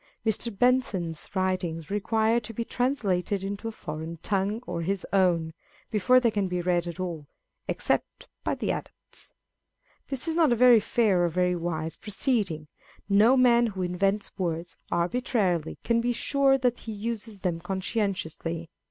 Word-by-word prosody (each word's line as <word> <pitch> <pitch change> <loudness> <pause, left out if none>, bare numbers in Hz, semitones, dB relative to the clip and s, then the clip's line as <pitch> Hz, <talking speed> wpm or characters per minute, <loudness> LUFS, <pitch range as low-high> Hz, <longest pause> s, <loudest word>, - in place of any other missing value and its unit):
Mr. 220 +2 +2
Bentham's 200 -10 +1
writings 185 -3 -1
require 220 +3 +2
to 225 -1 -9
be 230 - -2
translated 205 -8 0
into 200 +3 -4
a - - -3
foreign 160 -4 -6
tongue 200 +2 0
or 170 - -3
his 190 +3 -2
own, 170 -4 +2 0.4
before 225 +4 +5
they 235 -2 +2
can 205 -2 0
be 180 -1 -2
read 175 -1 +1
at 170 +1 -6
all, 170 -5 -4 0.4
except - - -1 0.2
by - - 0
the - - -1
adepts. - - -7 0.8
This 270 +3 -4
is 325 - 0
not 320 -5 +4
a - - +4
very 245 -1 +7
fair 205 -4 +2
or 175 - +2
very 180 +1 +1
wise 165 -2 -3
proceeding. 200 - -1 0.4
No 215 +6 +5
man 240 -2 +5
who 190 -4 -3
invents 195 +3 0
words 170 -1 -2 0.2
arbitrarily 180 - 0
can 230 0 +2
be 245 +1 +1
sure 275 +2 +3
that 250 -2 0
he 225 - -7
uses 215 -1 -5
them 175 -3 -1
conscientiously. 180 -3 -3
195 Hz, 155 wpm, -27 LUFS, 175-230 Hz, 0.8 s, very